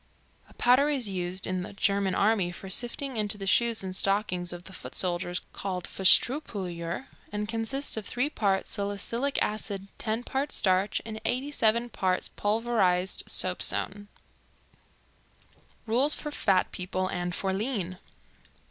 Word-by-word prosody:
A - - -19
powder 255 +4 +5
is 260 -8 +1
used 180 0 -3
in 185 -1 -1
the 200 +3 -7
German 200 -1 +1
army 200 -4 +2
for 190 +2 -8
sifting 245 +4 -2
into 210 -1 0
the 195 - -5
shoes 230 +2 +3
and 185 -1 -4
stockings 195 -3 0
of 175 0 -7
the 190 - -11
foot - - -8
soldiers, 180 0 0
called 185 -2 -3
"Fusstreupulver," 190 - +2 0.3
and 210 0 -2
consists 230 +5 -1
of 220 -2 -5
3 250 +4 0
parts 195 -6 0
salicylic 225 +7 -1
acid, 200 -2 -3
10 220 +2 -1
parts 270 +3 -1
starch 190 +1 +2
and 220 -1 -6
87 240 -2 +2
parts 185 -4 0
pulverized 205 -4 +1
soapstone. 195 +2 +1 1.8
Rules 255 +7 +3
for 300 - -5
Fat 195 -9 +2
People 185 0 -2
and 175 -1 -2
for 190 -1 -1
Lean. 195 -4 -2
200 Hz, 140 wpm, -28 LUFS, 185-235 Hz, 1.8 s, powder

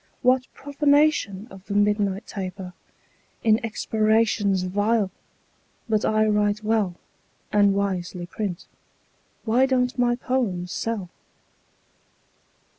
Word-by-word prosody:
"What 255 0 +2
profanation 285 -8 +1
of 190 0 -13
the 200 - -3
midnight 205 -1 +1
taper 185 -2 -6 0.7
In 220 +1 +3
expirations 215 -3 +1
vile! 205 +2 +1 0.8
But 215 -1 +1
I 215 0 +2
write 210 0 +1
well, 215 -5 +1 0.6
And 205 -1 +4
wisely 185 -3 -2
print. 185 -1 -5 0.8
Why 245 +4 +3
don't 250 -1 0
my 240 -1 +3
poems 225 -9 -2
sell?" 210 -6 -3
210 Hz, 100 wpm, -24 LUFS, 195-230 Hz, 0.8 s, And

